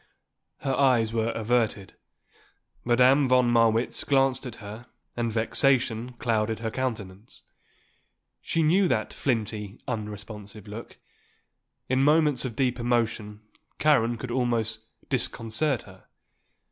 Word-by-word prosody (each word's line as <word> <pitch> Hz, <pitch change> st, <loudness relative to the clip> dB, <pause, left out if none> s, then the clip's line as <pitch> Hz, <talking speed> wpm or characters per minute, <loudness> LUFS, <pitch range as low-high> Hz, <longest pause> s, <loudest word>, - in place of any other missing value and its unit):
Her 135 Hz, -, -1 dB
eyes 125 Hz, -5 st, +3 dB
were 115 Hz, 0 st, 0 dB
averted. 110 Hz, -4 st, 0 dB, 0.9 s
Madame 130 Hz, +3 st, +4 dB
von 125 Hz, -1 st, +4 dB
Marwitz 115 Hz, 0 st, +2 dB
glanced 135 Hz, -1 st, +2 dB
at 120 Hz, -, -8 dB
her 110 Hz, +3 st, -10 dB, 0.3 s
and 115 Hz, -1 st, -1 dB
vexation 120 Hz, +1 st, +1 dB
clouded 110 Hz, -2 st, 0 dB
her 115 Hz, 0 st, -4 dB
countenance. 110 Hz, -5 st, -5 dB, 1.0 s
She 165 Hz, -, 0 dB
knew 180 Hz, +5 st, +4 dB
that 110 Hz, -9 st, -1 dB
flinty, 110 Hz, -4 st, -2 dB
unresponsive 105 Hz, -2 st, -7 dB
look. 110 Hz, +3 st, -9 dB, 0.9 s
In 130 Hz, +1 st, +2 dB
moments 150 Hz, -2 st, +3 dB
of 120 Hz, -4 st, -4 dB
deep 125 Hz, -1 st, 0 dB
emotion 115 Hz, -3 st, -1 dB, 0.4 s
Karen 120 Hz, -6 st, +3 dB
could 120 Hz, +2 st, -6 dB
almost 115 Hz, -3 st, 0 dB, 0.3 s
disconcert 120 Hz, +1 st, -1 dB
her. 95 Hz, -1 st, -16 dB
120 Hz, 110 wpm, -26 LUFS, 110-130 Hz, 1.0 s, Madame